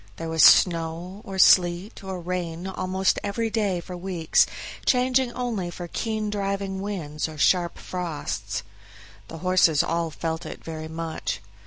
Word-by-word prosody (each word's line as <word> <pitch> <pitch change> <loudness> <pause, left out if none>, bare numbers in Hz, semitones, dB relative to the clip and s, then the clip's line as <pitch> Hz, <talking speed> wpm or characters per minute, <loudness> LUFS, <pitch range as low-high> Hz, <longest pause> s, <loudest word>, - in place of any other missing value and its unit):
There 165 0 -5
was 160 -1 +1
snow, 170 +4 +4
or 195 -1 -7
sleet, 180 +2 +4
or 190 -1 -5
rain 175 -1 -4
almost 190 0 0
every 220 +2 -1
day 205 -5 0
for 180 +1 -8
weeks, 175 -3 +2 0.4
changing 255 0 +2
only 225 -8 -2
for 175 0 -7
keen 215 +2 -2
driving 195 -1 -2
winds 160 -7 -3
or 155 - -9
sharp 170 +4 +2
frosts. 175 -4 -4 0.6
The 165 - -8
horses 180 -3 +4
all 170 0 -1
felt 160 +1 -4
it 160 - -8
very 160 -1 -6
much. 160 0 -4
180 Hz, 145 wpm, -25 LUFS, 165-195 Hz, 0.6 s, snow